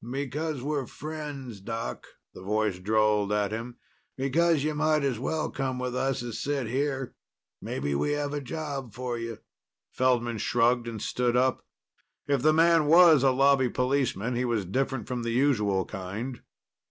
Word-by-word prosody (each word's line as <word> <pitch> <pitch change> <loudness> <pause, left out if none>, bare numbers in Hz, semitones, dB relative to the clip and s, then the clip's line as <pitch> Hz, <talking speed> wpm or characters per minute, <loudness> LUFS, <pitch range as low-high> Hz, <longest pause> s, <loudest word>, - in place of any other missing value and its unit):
"Because 140 +2 -3
we're 145 -3 -2
friends, 145 -7 -7
Doc," 115 +3 -5 0.3
the - - -11
voice 105 -1 0
drawled 105 +1 +2
at 105 -1 +1
him. 115 +2 -5 0.4
"Because 155 +3 +2
you 155 0 0
might 155 0 +2
as 130 -5 0
well 155 +4 -2
come 135 -1 -2
with 125 0 -3
us 135 -1 -1
as 120 -2 -5
sit 140 -3 -1
here. 135 +2 -2 0.5
Maybe 70 +1 -3
we 145 - 0
have 145 -1 -2
a 145 - -2
job 140 -5 -5
for 125 -1 -3
you." 115 -1 -5 0.5
Feldman 120 -3 +1
shrugged 120 +2 +2
and 115 -2 -5
stood 125 +3 0
up. 130 +1 +1 0.6
If 140 -3 +1
the 155 +3 +5
man 165 -1 +4
was 165 -2 +7
a 135 - +5
Lobby 135 0 +4
policeman, 125 -4 0
he 125 - 0
was 115 -5 0
different 130 +4 -2
from 125 -2 -3
the 115 - -3
usual 105 -8 +2
kind. 105 +7 -6
130 Hz, 165 wpm, -27 LUFS, 115-145 Hz, 0.6 s, was